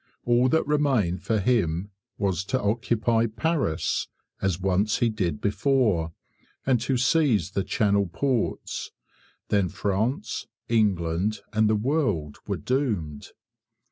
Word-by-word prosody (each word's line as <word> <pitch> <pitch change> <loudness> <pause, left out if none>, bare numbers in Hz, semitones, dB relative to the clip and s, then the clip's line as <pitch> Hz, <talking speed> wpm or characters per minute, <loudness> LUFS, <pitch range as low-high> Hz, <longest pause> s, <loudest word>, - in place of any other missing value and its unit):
All 120 +1 +4
that 160 - +2
remained 130 - +1
for 110 -1 0
him 100 -4 +1 0.3
was 95 -3 0
to 130 +5 0
occupy 115 +1 +1
Paris, 125 - -1 0.3
as 95 -2 0
once 95 +3 +1
he 120 - +2
did 90 -9 -2
before, 105 - +1 0.5
and 125 -4 +2
to 130 +2 0
seize 125 - +2
the 100 - -1
Channel 100 -2 +1
ports. 125 +6 -2 0.6
Then 100 -3 +2
France, 100 +6 -2 0.2
England, 100 -2 +1
and 110 0 +3
the 110 - +3
world 105 - 0
were - - -1
doomed. 105 - -2
105 Hz, 120 wpm, -26 LUFS, 95-125 Hz, 0.6 s, All